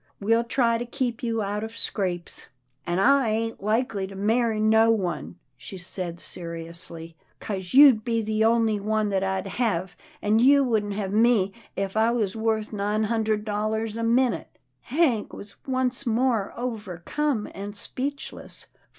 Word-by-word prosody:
We'll 225 +3 +2
try 235 -1 +1
to 240 - -3
keep 245 -2 -2
you 225 -2 -1
out 205 +2 -2
of 225 +1 -7
scrapes." 180 -6 -3 0.2
" 130 +4 -29
An' 175 0 0
I 265 +5 +4
ain't 225 0 -2
likely 215 -1 0
to 195 - -10
marry 220 +2 +1
no 220 +1 +4
one," 175 - -1 0.2
she 130 +10 -9
said 175 -1 -6
seriously, 170 -1 -4
" - - -39
'cause 190 0 -5
you'd 270 -6 +8
be 230 -1 0
the 215 0 0
only 225 -2 +3
one 215 +1 0
that 195 -1 0
I'd 190 0 -1
hev, 195 -4 -1 0.2
an' 215 +2 +2
you 280 +3 +6
wouldn't 215 -5 0
hev 200 -1 -3
me 215 -3 +3 0.2
if 195 0 -3
I 220 +1 +3
was 225 -4 0
wuth 220 -1 -1
nine 210 +1 0
hun 225 +1 0
dred 215 -1 0
dollars 215 +1 -2
a 230 - -3
minute." 240 +2 +1 0.2
Hank 260 -6 +1
was 205 - -9
once 260 0 0
more 230 -3 +1
overcome 225 - -2
and 205 +1 -7
speechless. 275 +6 -5
215 Hz, 165 wpm, -25 LUFS, 195-235 Hz, 0.2 s, you'd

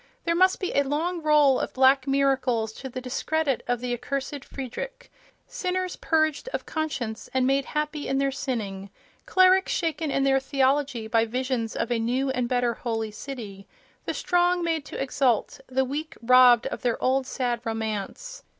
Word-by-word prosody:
There 335 - +2
must 370 +2 +3
be 370 - -2
a 280 - +4
long 320 +5 -1
roll 300 -4 +4
of - - -3
black 265 +1 +4
miracles 260 -5 +1
to 265 - -8
the 255 - -5
discredit 275 +1 -1
of 245 -1 0
the 250 -1 -2
Accursed 275 +3 -4
Friedrich—sinners 370 - -6
purged 315 +6 0
of - - -4
conscience 275 -9 -4
and 260 -1 +3
made 275 +1 +2
happy 300 0 -3
in 270 - 0
their 275 0 +1
sinning, 205 -8 -4 0.4
clerics 370 0 +4
shaken 325 -2 -1
in 275 0 +1
their 270 0 +3
theology 270 -3 0
by 225 0 +2
visions 250 -1 -2
of 230 - -2
a 235 - +1
new 255 +4 0
and 250 -2 -1
better 245 -2 +1
holy 225 -2 -3
city, 210 -5 -8 0.4
the - - -3
strong 355 0 +2
made 325 -3 -1
to - - -7
exult, 265 -4 0
the 265 +1 0
weak 295 +4 -5
robbed 245 0 +6
of - - -4
their 240 -2 0
old 260 0 +1
sad 245 -3 -2
romance. 225 - -4
270 Hz, 170 wpm, -26 LUFS, 240-305 Hz, 0.4 s, robbed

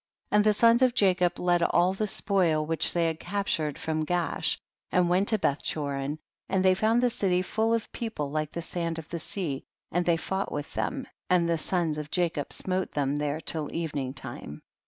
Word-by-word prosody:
14. - - +2
And - - +5
the 215 - +5
sons 230 +3 +5
of 255 -1 +4
Jacob 180 -5 +3
led 175 -1 +2
all 175 +2 +3
the 210 +2 -1
spoil 175 -7 +2
which 160 +1 +1
they 170 -1 +1
had 160 -1 -1
captured 175 -6 -1
from 155 -1 -1
Gaash 175 +1 0 0.3
and 180 -1 +3
went 190 +3 +3
to 220 - +6
Bethchorin, 140 -3 -1 0.3
and 190 -1 +1
they 185 - +6
found 220 +5 +2
the 250 - +4
city 185 -4 +1
full 220 +4 0
of 230 -1 0
peo 230 - -3
ple 150 -10 -4
like 155 0 -2
the 170 - -5
sand 170 -1 -3
of 160 -1 -7
the 170 - -4
sea, 155 -5 -3 0.3
and 175 +1 +1
they 170 -1 +2
fought 190 +4 -3
with 145 -1 -5
them, 270 -1 -2 0.2
and 175 -2 +4
the 165 -1 +1
sons 165 -3 0
of 150 0 -6
Jacob 170 -5 -1
smote 185 0 -2
them 145 0 0
there 150 +1 -1
till 155 -2 -2
evening 145 -6 -2
time. 120 - -7
175 Hz, 205 wpm, -28 LUFS, 155-190 Hz, 0.3 s, to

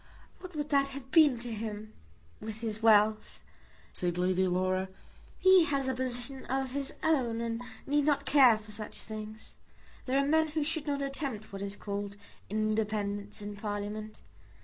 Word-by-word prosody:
"What 365 -2 -10
would 295 0 -3
that 275 -1 +3
have 260 -1 -11
been 300 -6 +6
to 235 +1 -5
him, 215 0 -5 0.5
with 220 0 -7
his 220 -1 -3
wealth?" 215 -1 +3 0.5
said 175 -1 -1
Lady 185 +1 +2
Laura. 185 +1 0 0.5
"He 375 -2 +6
has 275 -3 0
a 260 - +1
position 255 +1 -4
of 265 0 -1
his 280 +1 -3
own 255 -8 +2
and 230 0 -2 0.2
need 290 0 +2
not 285 -2 +2
care 260 -4 +6
for 215 0 -12
such 210 0 -6
things. 215 0 -8 0.5
There 260 +1 +1
are 275 - +3
men 315 +2 +3
who 310 0 -1
should 315 0 -2
not 280 -1 0
attempt 270 -7 -4
what 195 - -5
is 200 0 -4
called 200 -1 -4 0.3
independence 210 -1 -1
in 205 0 -6
Parliament. 210 +1 -5
225 Hz, 165 wpm, -31 LUFS, 210-275 Hz, 0.5 s, been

